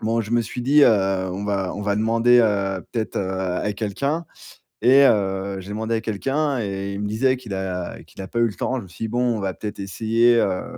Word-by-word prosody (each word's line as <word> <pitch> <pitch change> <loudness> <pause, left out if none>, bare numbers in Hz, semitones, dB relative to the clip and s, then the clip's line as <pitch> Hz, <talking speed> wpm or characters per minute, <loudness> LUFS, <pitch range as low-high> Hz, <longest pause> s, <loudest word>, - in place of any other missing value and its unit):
bon, 115 +1 +1
je 110 - -6
me 120 - +4
suis 125 +3 -6
dit, 145 +4 +5
heu: - - +7 0.4
«On 100 +3 -4
va 100 -3 -1
on 105 - -5
va 100 0 0
demander, 115 +3 +4
heu, 100 -4 0
peut-être, 115 -2 -3
heu, 95 -1 -1 0.3
à 105 - -1
quelqu'un» 140 +11 -2 0.6
et 135 +3 +7
heu, 95 -3 +1
j'ai 95 - -11
demandé 110 +2 -2
à 110 - -1
quelqu'un 135 +6 -1
et 100 -1 -3
il 100 - -5
me 105 - -2
disait 130 +5 +1
qu'il 115 -6 -8
a 90 -2 -4
qu'il - - -12
a 95 - -7
pas 115 - -3
eu 120 - +4
le 105 - -6
temps. 130 - -2
Je 125 - -5
me - - -12
suis 110 - -6
dit, 110 - -4
bon, 120 0 0
on - - -4
va 95 -1 -2
peut-être 105 -1 -7
essayer, 115 +4 +2
heu, 95 -4 0
110 Hz, 245 wpm, -22 LUFS, 100-120 Hz, 0.6 s, heu